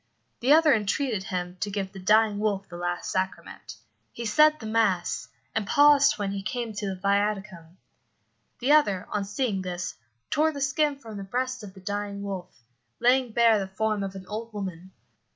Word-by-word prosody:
The 255 +4 +2
other 310 -1 +7
entreated 215 -1 0
him 180 -1 -4
to 205 - -2
give 195 -1 -3
the 195 - -10
dying 210 +2 +3
wolf 200 -2 -1
the 175 - -10
last 175 0 -3
sacrament. 170 - -4 0.4
He 235 - -6
said 305 +8 +5
the 220 - -8
mass, 205 - 0 0.3
and 220 -2 -1
paused 290 0 +5
when 200 -2 -2
he 200 0 -3
came 235 +2 -4
to 205 0 -4
the 190 - -2
viaticum. 200 -3 -1 0.8
The 255 +4 +1
other, 205 -12 +4
on 205 -1 -1
seeing 205 -1 -1
this, 180 0 -4 0.4
tore 310 +2 +2
the 285 - -6
skin 290 +1 +1
from 225 -6 -9
the 200 - -5
breast 255 +5 -2
of 200 -2 -10
the 190 - -13
dying 200 +1 -4
wolf, 185 -10 -7 0.4
laying 250 0 +3
bare 230 -1 +4
the 195 - -3
form 215 +2 -1
of 195 -1 -4
an 190 -1 -8
old 220 +4 -6
woman. 190 -3 -6
205 Hz, 185 wpm, -26 LUFS, 190-240 Hz, 0.8 s, other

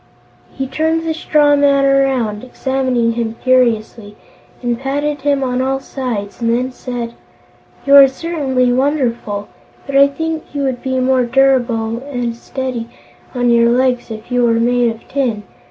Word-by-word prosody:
He 270 - -3
turned 320 +4 -1
the 320 - 0
straw 300 -2 +3
man 280 -1 +3
around, 265 -6 +1
examining 255 -2 -1
him 230 -1 -3
curiously, 230 -4 +1 0.5
and 240 -1 -1
patted 285 +2 -2
him 280 -1 +1
on 250 -1 -1
all 270 +1 0
sides, 240 -7 -5
and 230 - +1
then 250 +3 0
said: 245 -2 -6 0.7
"You 280 0 +5
are 275 -1 +9
certainly 265 -4 -1
wonderful, 245 -7 -1 0.4
but 275 - -5
I 280 0 +7
think 320 +1 -5
you 285 - -1
would 260 -2 -2
be 260 -1 -1
more 260 0 +2
durable 240 -3 +1
and 245 -4 -4
steady 245 -1 -5 0.5
on 245 -1 +2
your 235 0 +4
legs 250 0 +1
if 220 +2 -9
you 245 0 +2
were 230 -1 +2
made 245 0 +2
of 225 0 -8
tin. 245 -7 -1
255 Hz, 155 wpm, -16 LUFS, 235-275 Hz, 0.7 s, are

